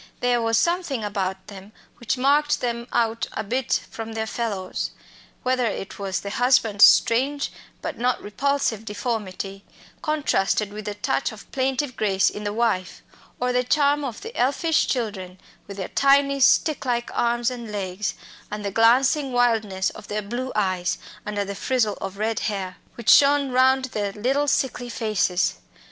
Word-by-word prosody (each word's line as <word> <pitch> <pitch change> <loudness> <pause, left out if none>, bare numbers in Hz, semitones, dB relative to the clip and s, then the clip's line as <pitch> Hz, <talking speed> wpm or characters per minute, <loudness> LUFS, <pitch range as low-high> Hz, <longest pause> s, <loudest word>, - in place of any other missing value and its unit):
There 245 -1 +2
was 225 0 +2
something 340 -7 0
about 190 -2 -3
them 200 +1 -12 0.2
which 235 +2 -2
marked 290 +3 +3
them 235 -1 -3
out 230 -1 0
a - - -3
bit 250 +4 0
from 225 0 -6
their 220 0 -2
fellows 210 -5 -3 0.5
whether 255 -1 +1
it 195 - -5
was 195 -1 -2
the 200 - -5
husband's 230 -4 +5
strange 275 +5 +2 0.3
but - - -4
not 250 +1 +1
repulsive 240 -1 -1
deformity, 205 -3 -4 0.4
contrasted 215 -9 0
with 210 0 -7
the 210 -1 -4
touch 260 +6 -1
of 220 -1 -13
plaintive 265 0 -1
grace 195 -3 +2
in 210 - -7
the 205 - -1
wife, 215 -5 -1 0.4
or 250 0 0
the 250 0 +2
charm 290 +2 +2
of 245 -5 -5
the 455 +3 -8
elfish 285 +5 +2
children, 195 -7 -3 0.3
with 200 0 -8
their 190 - -4
tiny 275 0 +3
stick 300 +3 +4
like 240 -2 -1
arms 240 +1 +1
and 235 -3 -7
legs, 195 0 -3 0.3
and 210 0 -5
the 200 - -2
glancing 255 +6 +3
wildness 225 -6 +1
of - - -12
their 210 0 -3
blue 245 +5 -4
eyes, 185 -3 0 0.3
under 205 -1 -2
the 200 - -5
frizzle 220 +1 0
of 195 0 -5
red 220 +1 -1
hair, 190 -3 -3 0.2
which 235 - +2
shone 280 -1 +5
round 260 +1 +4
their 210 -5 -3
little 270 +7 0
sickly 255 -3 0
faces. 190 -6 0
230 Hz, 160 wpm, -24 LUFS, 205-260 Hz, 0.5 s, husband's